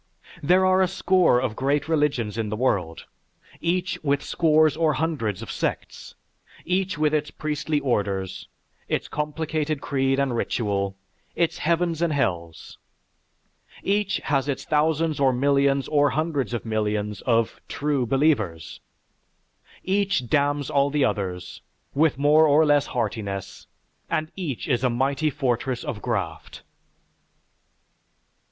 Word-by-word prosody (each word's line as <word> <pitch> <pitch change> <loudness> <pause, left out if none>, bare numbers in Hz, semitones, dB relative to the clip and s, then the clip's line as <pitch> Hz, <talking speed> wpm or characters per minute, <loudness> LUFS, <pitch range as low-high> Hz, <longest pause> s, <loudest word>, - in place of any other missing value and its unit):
There 185 +5 +4
are 185 0 +4
a 185 - +4
score 185 -7 +3
of 125 -4 -2
great 140 +4 0
religions 145 -9 0
in 110 -2 -2
the 110 - -2
world, 95 -9 -1 0.5
each 175 0 -1
with 140 -1 +1
scores 155 -2 +3
or 160 -1 +2
hundreds 130 - -2
of - - -7
sects, - - -4 0.5
each 185 0 0
with 155 0 +1
its 150 -1 0
priestly 150 0 -2
orders, 100 -8 -2 0.4
its - - -1
complicated 155 0 -2
creed 135 -1 0
and 135 -3 0
ritual, 100 -4 -1 0.4
its 170 -2 0
heavens 170 0 0
and 170 -2 +2
hells. 85 - -3 1.0
Each 200 0 +1
has 135 -1 0
its 135 - -3
thousands 155 -1 +1
or 135 -2 +4
millions 140 +1 +2
or 145 -1 +3
hundreds 145 -7 -1
of 120 - -5
millions 105 -2 -2
of 115 -2 +1
"true 145 -4 -1
believers"; 110 - 0 1.0
each 195 -9 0
damns 145 +1 +1
all 140 0 +3
the 145 -1 +2
others, 90 -3 -3 0.3
with 150 -1 +2
more 150 +3 +5
or 150 +2 +5
less 145 -1 +3
heartiness, 105 -5 -4 0.4
and 155 +1 -1
each 160 -10 -4
is 125 -3 0
a 125 - +3
mighty 135 +5 0
fortress 130 -3 -1
of 105 - -5
Graft. - - -4
140 Hz, 130 wpm, -24 LUFS, 115-155 Hz, 1.0 s, more